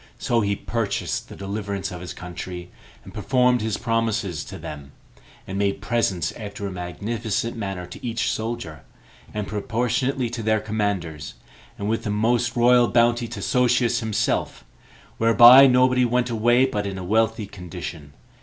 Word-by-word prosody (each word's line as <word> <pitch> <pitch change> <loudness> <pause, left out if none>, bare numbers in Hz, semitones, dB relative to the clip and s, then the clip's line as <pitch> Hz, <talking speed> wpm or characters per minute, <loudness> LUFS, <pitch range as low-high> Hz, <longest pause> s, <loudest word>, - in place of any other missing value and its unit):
So 120 -1 +1
he 100 -1 0
purchased 110 -2 -3
the - - -9
deliverance 100 -1 -4
of 90 -1 -7
his 90 - -7
country, 90 0 -7 0.3
and - - -12
performed 125 +3 +2
his 110 -1 -1
promises 115 -8 -1
to - - -8
them, 70 -2 -9 0.5
and 95 +1 -4
made 100 -1 0
presents 100 -4 0
after 100 -2 -7
a 100 - -4
magnificent 105 +6 -3
manner 95 -5 -4
to 90 - -12
each 115 -3 -1
soldier, 105 -9 -4 0.5
and 105 -2 -4
proportionably 120 +5 -1
to 120 -1 -4
their 110 0 +2
commanders, 100 -9 -3 0.4
and 100 - -4
with 115 +1 -1
a - - -1
most 115 +3 +1
royal 120 0 +5
bounty 120 0 +2
to 115 - -7
Sosius 125 -1 +2
himself, 110 -1 -1 0.5
whereby 120 +4 +9
nobody 125 0 +4
went 125 0 +1
away 120 +3 +3
but 105 -6 -2
in 95 -1 -5
a 95 - -6
wealthy 110 +3 +1
condition. 90 -6 -8
110 Hz, 155 wpm, -23 LUFS, 100-120 Hz, 0.5 s, whereby